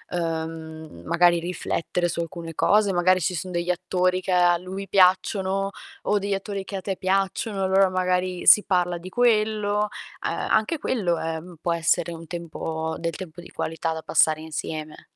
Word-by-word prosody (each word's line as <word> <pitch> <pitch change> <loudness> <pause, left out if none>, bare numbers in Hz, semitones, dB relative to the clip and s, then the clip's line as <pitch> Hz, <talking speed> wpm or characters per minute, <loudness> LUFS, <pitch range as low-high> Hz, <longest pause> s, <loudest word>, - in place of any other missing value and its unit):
uhm, 160 - -4
magari 170 0 +4
riflettere 175 0 -2
su 170 0 -2
alcune 165 0 -6
cose, 205 -2 +3
magari 185 +1 +3
ci 180 +2 -1
son 180 +3 -4
degli 175 0 -2
attori 185 +1 +1
che 185 - -3
a 175 -1 +4
lui 190 +3 -7
piacciono, 190 +1 +2 0.3
o 210 - +2
degli 200 0 -2
attori 195 0 -3
che 195 - -7
a - - -5
te 195 +1 -3
piacciono, 195 +2 -1
allora 190 0 +4
magari 185 0 -1
si 210 - +8
parla 180 -2 +1
di 185 +2 -9
quello. 215 -2 +2 0.4
Uhm, - - -1
anche 220 +10 0
quello, 195 - 0
ehm, 165 +2 -5
può 170 - 0
essere 170 +1 +1
un 165 0 -10
tempo 160 -1 -4
del 165 -1 -3
tempo 175 -2 -8
di - - -13
qualità 165 0 -3
da 160 - -6
passare 155 0 +3
insieme. 155 -1 -6
180 Hz, 170 wpm, -24 LUFS, 165-195 Hz, 0.4 s, si